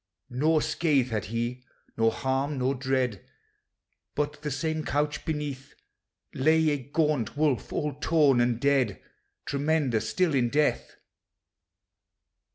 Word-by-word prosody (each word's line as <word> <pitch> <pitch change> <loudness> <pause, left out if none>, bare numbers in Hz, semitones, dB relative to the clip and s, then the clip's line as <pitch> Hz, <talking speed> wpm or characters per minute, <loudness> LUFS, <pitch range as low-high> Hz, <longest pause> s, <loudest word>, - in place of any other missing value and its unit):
Nor 155 +5 +2
scathe 140 -7 +1
had 105 -3 -2
he, 120 +3 -3 0.3
nor 115 0 +3
harm, 135 +4 -1
nor 130 +1 +1
dread, 130 - -1 0.9
But, 145 0 -2
the 150 - -3
same 155 +3 -2
couch 145 0 -1
beneath, 145 -4 -4 0.6
Lay 155 +3 +3
a 145 - +1
gaunt 145 -2 -1
wolf, 150 -4 0
all 150 -1 -2
torn 145 -3 +3
and 120 -1 +1
dead, 135 -6 +1 0.5
Tremendous 140 -6 0
still 175 +6 +1
in 125 -3 +2
death. 150 +3 0
140 Hz, 120 wpm, -27 LUFS, 125-150 Hz, 0.9 s, nor